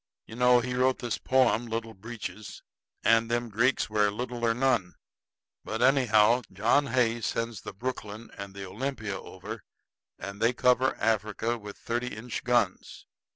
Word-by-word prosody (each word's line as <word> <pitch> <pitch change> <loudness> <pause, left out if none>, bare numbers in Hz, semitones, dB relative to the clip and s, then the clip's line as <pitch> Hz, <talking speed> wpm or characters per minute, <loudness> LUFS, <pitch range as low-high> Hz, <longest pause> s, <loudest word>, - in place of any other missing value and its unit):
You 110 - -10
know 125 0 +5
he 125 +1 -3
wrote 130 +1 +2
this 120 -2 -3
poem, 125 -3 +2
'Little 115 0 -4
Breeches'; 110 0 -8 0.4
and 115 0 +4
them 120 0 -1
Greeks 120 +5 +2
wear 105 -1 +2
little 120 +3 -5
or 115 -1 +3
none. 120 -8 +1 0.7
But 110 +2 -2
anyhow, 120 -3 +5
John 115 +9 +2
Hay 120 -3 +1
sends 115 0 -2
the - - -7
Brooklyn 110 0 -6
and 100 0 -8
the 100 -1 -6
Olympia 110 0 -4
over, - - -8 0.6
and 100 +1 -7
they 115 +2 +3
cover 125 +1 +3
Africa 110 +1 0
with 105 -3 -9
thirty 120 +1 -3
inch 120 +2 -5
guns. 120 -6 0
115 Hz, 155 wpm, -28 LUFS, 105-125 Hz, 0.7 s, know